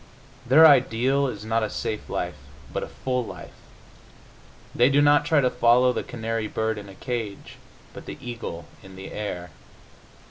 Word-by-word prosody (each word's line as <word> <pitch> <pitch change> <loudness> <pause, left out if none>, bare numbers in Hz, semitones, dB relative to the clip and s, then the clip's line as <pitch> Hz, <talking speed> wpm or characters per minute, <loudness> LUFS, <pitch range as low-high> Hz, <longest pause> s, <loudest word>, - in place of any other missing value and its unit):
Their 150 +6 +8
ideal 135 -1 +4
is 110 -4 -6
not 115 +1 0
a 110 - -1
safe 110 +1 -4
life, - - -2 0.4
but - - -2
a - - -5
full 125 -1 -2
life; - - -10 1.2
they 120 +2 +4
do 140 +1 +3
not 145 0 +4
try 145 -1 +3
to 125 - +2
follow 125 +1 +4
the - - -2
canary 115 -1 -4
bird 110 0 -2
in 100 -1 -11
a 95 - -12
cage, 115 -5 -5 0.4
but - - -11
the - - -7
eagle 115 -9 -7 0.2
in 95 0 -13
the 95 0 -9
air. 90 -4 -5
120 Hz, 170 wpm, -24 LUFS, 105-130 Hz, 1.2 s, Their